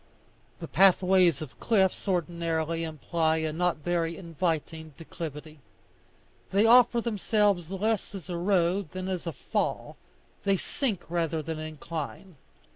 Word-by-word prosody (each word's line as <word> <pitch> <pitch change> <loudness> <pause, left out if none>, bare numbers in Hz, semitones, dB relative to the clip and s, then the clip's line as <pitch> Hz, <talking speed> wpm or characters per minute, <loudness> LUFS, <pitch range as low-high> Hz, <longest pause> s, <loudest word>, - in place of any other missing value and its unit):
The - - -6
pathways 185 -1 +4
of 140 - -12
cliffs 195 -4 +1
ordinarily 165 -2 -1
imply 160 +1 0
a 160 -1 -2
not 180 +1 0
very 165 +1 -1
inviting 160 -3 -3
declivity; 155 -2 -8 0.9
they 200 +3 +4
offer 240 0 +6
themselves 205 -5 +1
less 205 +2 -1
as 185 -4 -8
a 180 - -4
road 180 0 +1
than 185 0 -4
as 185 -2 -3
a - - -1
fall; 140 - -3 0.5
they 195 -1 +2
sink 215 -3 -2
rather 165 -2 -1
than 160 +1 -4
incline. 155 +2 -6
170 Hz, 125 wpm, -28 LUFS, 160-190 Hz, 0.9 s, offer